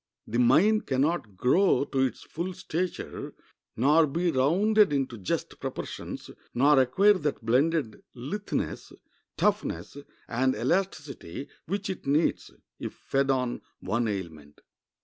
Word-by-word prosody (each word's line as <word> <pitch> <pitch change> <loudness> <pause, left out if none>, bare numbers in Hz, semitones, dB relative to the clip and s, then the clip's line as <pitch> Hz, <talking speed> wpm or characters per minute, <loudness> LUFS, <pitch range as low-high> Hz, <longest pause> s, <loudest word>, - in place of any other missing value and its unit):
The 120 +2 -2
mind 180 - +4
can 130 0 +1
not 140 - -1
grow 170 - +3
to 135 - -2
its 130 -1 0
full 175 +3 -5
stature, 180 0 -4 0.4
nor 150 +7 +5
be 170 +5 0
rounded 195 +10 +3
into 135 -4 -1
just 90 - -3
proportions, - - -6 0.2
nor 140 +3 +5
acquire 190 +12 +5
that 145 -6 -3
blended 135 +1 +1
litheness, 165 - -4 0.4
toughness, 85 +11 -1 0.3
and 130 +2 +1
elasticity 140 - -2 0.2
which 200 +4 -2
it 190 -7 -5
needs, 150 +4 +1 0.3
if - - -5
fed 135 0 -1
on 125 -2 0 0.2
one 115 +1 -1
aliment. 80 -8 -6
140 Hz, 125 wpm, -28 LUFS, 120-175 Hz, 0.4 s, nor